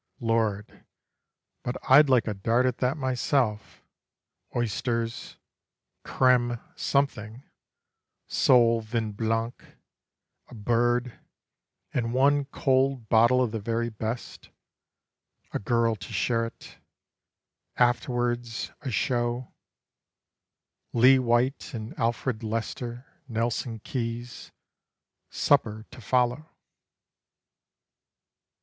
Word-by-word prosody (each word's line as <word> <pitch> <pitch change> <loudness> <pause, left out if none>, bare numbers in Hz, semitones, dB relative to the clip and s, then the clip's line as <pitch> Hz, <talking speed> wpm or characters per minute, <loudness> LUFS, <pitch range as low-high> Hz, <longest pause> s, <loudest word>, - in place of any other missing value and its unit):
(Lord, 110 -3 -1 0.8
but 125 - -3
I'd 145 +2 +7
like 125 -3 +3
a 105 - -1
dart 115 +6 +1
at 125 -2 -1
that 130 +3 0
myself 130 -4 -1 0.7
Oysters, 115 0 -2 0.7
crême 120 -2 +2 0.2
something, 125 -4 -1 0.8
sole 115 -2 +4
vin 110 0 -2
blanc, 115 +2 -2 0.8
a 125 - -13
bird, 120 +2 0 0.7
And 120 -1 -1
one 140 +2 +3
cold 135 -4 0
bottle 120 +3 +5
of 120 - -2
the 110 - -3
very 115 +3 -1
best 110 +2 -6 1.0
A - - -1
girl 115 +1 +1
to - - -10
share 115 -1 0
it: - - -14 1.0
afterwards, 120 -1 0
a 140 - -4
show 120 +2 -1 1.4
Lee 130 +3 +6
White 125 +3 0
and 110 0 -6
Alfred 115 0 -1
Lester, 115 +2 -4 0.2
Nelson 115 0 -2
Keys; 120 0 -5 0.8
Supper 110 -6 +1
to - - -12
follow. 125 +6 0
120 Hz, 90 wpm, -27 LUFS, 115-125 Hz, 1.4 s, I'd